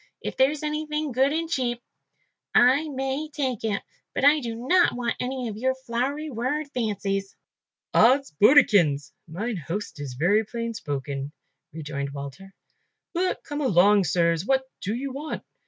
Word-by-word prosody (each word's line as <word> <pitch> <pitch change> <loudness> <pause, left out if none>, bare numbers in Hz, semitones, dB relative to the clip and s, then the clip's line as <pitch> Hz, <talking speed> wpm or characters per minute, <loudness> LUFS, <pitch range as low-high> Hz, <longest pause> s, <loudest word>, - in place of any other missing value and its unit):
If - - -5
there's 285 +3 +2
anything 300 -1 -2
good 265 +3 +3
and 325 +2 -1
cheap, 250 -6 -1 0.8
I 275 +6 +5
may 270 +2 -3
take 265 -7 -2
it, 210 -2 -1 0.3
but - - +1
I 295 +2 +6
do 235 -4 -4
not 360 +2 +4
want 245 -1 -1
any 255 -1 -3
of 210 -2 -5
your 260 +3 0
flowery 265 +4 -3
word 255 +6 -1
fancies." 200 -4 -2 0.6
"Odds 265 +5 +4
bodikins! 175 - +5 0.2
mine 205 +7 -3
host 170 +3 -5
is 135 -3 -6
very 195 - +3
plain 230 +1 -4
spoken," 145 -7 -4 0.4
rejoined 145 -3 -5
Walter, 145 +8 -8 0.6
"but 365 +1 -1
come 290 0 -4
along, 200 - +4
sirs, 170 0 +2
what 265 +4 +2 0.2
do 205 +3 -2
you 270 +2 -4
want?" 295 +3 -5
240 Hz, 150 wpm, -25 LUFS, 195-280 Hz, 0.8 s, I